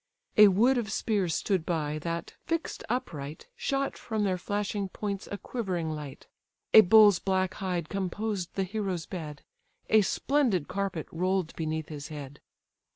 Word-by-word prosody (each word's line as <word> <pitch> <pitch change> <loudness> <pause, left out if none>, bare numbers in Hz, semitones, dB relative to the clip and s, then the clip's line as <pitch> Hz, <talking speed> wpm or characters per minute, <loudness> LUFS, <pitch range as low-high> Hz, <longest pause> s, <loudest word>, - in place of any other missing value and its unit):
A 210 0 +9
wood 235 +7 +4
of 215 -2 -4
spears 200 -7 0
stood 190 -5 0
by, 155 -3 -1
that, 170 +2 -4
fix'd 330 0 -2
upright, 155 - -4
Shot 275 0 -1
from 220 -2 -2
their 185 -2 0
flashing 205 0 -2
points 200 0 -4
a 205 - -3
quivering 185 -9 -3
light. 150 -3 -7 0.5
A 220 - +12
bull's 205 -1 +7
black 190 -1 0
hide 180 -4 -2
composed 195 0 -3
the 195 - +1
hero's 190 -3 -3
bed; 150 -5 -7 0.5
A 220 - +7
splendid 230 - +1
carpet 195 -4 -2
roll'd 185 0 -1
beneath 160 -1 -3
his 145 -2 -6
head. 145 -3 -8
190 Hz, 150 wpm, -29 LUFS, 160-210 Hz, 0.5 s, A